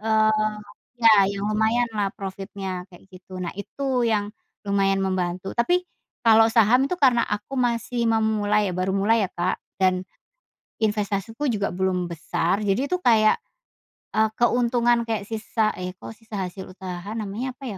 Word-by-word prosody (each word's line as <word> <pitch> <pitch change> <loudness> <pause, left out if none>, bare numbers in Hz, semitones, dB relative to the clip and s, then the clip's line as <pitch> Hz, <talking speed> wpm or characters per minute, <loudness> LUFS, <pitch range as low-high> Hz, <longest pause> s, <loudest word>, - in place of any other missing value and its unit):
eee 215 -1 +2 0.4
ya, 230 - +7 0.2
eee, 200 +1 -2
yang 200 - -3
lumayan 220 +3 +1
lah 200 -1 +1
profitnya 195 -2 -6
kayak 175 -1 -17
gitu. 185 0 -11
Nah, 175 - -4
itu 260 +5 -2
yang 210 -2 0 0.3
lumayan 195 -1 +1
membantu, 185 0 -2
tapi 355 +10 +2 0.4
kalau 225 -1 +6
saham 240 +4 +4
itu 360 - -1
karena 245 -4 +4
aku 210 +6 -4
masih 235 -1 0
memulai 210 -2 +2
ya, - - -5
baru 185 +1 0
mulai 210 +2 +3
ya, - - -18
Kak, 175 +1 -1 0.2
dan 185 0 +2 0.8
investasiku 210 +4 -1
juga 210 -6 0
belum 180 -1 -1
besar. 170 +3 -1
Jadi 240 +9 +1
itu 365 - +2
kayak, 220 -9 +4 0.8
eee, 220 0 +3
keuntungan 240 0 +2
kayak 220 -3 -2
sisa 220 0 0
eh, 185 0 -5
kok 220 - -9
sisa 225 -1 -10
hasil 190 +1 -6
usaha 180 +1 -7
namanya 225 +5 -4
apa 275 - -12
210 Hz, 155 wpm, -24 LUFS, 190-230 Hz, 0.8 s, ya